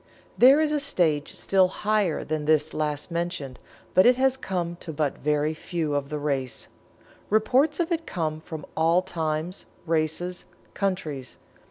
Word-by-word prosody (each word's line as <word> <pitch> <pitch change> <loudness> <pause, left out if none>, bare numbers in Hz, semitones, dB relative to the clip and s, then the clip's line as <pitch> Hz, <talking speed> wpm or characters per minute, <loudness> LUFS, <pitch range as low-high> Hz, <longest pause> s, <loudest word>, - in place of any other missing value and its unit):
There 265 +4 +7
is 310 -1 +2
a 300 - +1
stage 170 - +1
still 190 -1 +3
higher 210 -3 0
than 155 -1 -3
this 155 0 +2
last 150 +1 -2
mentioned 170 -6 -3 0.3
but 185 - +6
it 250 - +6
has 265 0 +3
come 175 -8 -3
to 170 - -7
but 150 -2 -2
very 150 +1 +1
few 160 -1 -3
of 140 -1 -1
the 150 - -3
race. 140 -4 -2 0.6
Reports 260 - +3
of 345 0 0
it 330 -1 -1
come 155 -2 -2
from 155 -2 -8
all 165 +3 +3
times, 160 0 -3 0.2
races, 165 +2 -1 0.3
countries. 155 -9 -3
165 Hz, 155 wpm, -26 LUFS, 150-195 Hz, 0.6 s, There